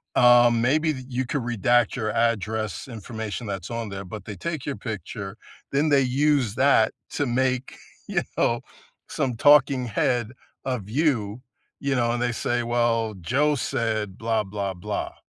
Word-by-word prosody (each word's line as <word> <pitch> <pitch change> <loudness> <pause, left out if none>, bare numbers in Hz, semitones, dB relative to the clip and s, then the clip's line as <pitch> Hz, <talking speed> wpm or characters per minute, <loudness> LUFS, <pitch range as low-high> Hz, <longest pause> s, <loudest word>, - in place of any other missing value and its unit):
um, 120 -1 +6
maybe 155 +5 +2
y 130 -2 -7
you 130 0 -2
could 140 +3 -1
redact 120 0 +2
your 110 -4 -1
address, 110 -1 -1
information 110 -1 -6
that's 95 -2 -5
on 115 -2 -3
there, 100 0 -6
but 105 +2 -8
they 105 - -6
take 155 - -4
your 140 - -2
picture, 105 -2 -6 0.3
then 145 +3 +2
they 140 -2 +5
use 135 -3 +2
that 130 -3 +4 0.2
to 145 - -1
make, 130 +1 0 0.3
you - - 0 0.2
know, 115 0 +2 0.5
some 125 -3 -2
talking 140 -1 +5
head 120 +2 0 0.3
of 125 -7 -3
you, 120 -5 0 0.4
you 140 0 -1
know, 120 -2 +2
and 120 - -2
they 120 - +1
say, 120 +1 -1
"Well, 115 -2 +1
Joe 145 - +2
said, 110 -6 -2
'Blah, 115 -2 0
blah, 100 -1 -3
blah.'" 90 - -4
120 Hz, 160 wpm, -25 LUFS, 110-130 Hz, 0.5 s, um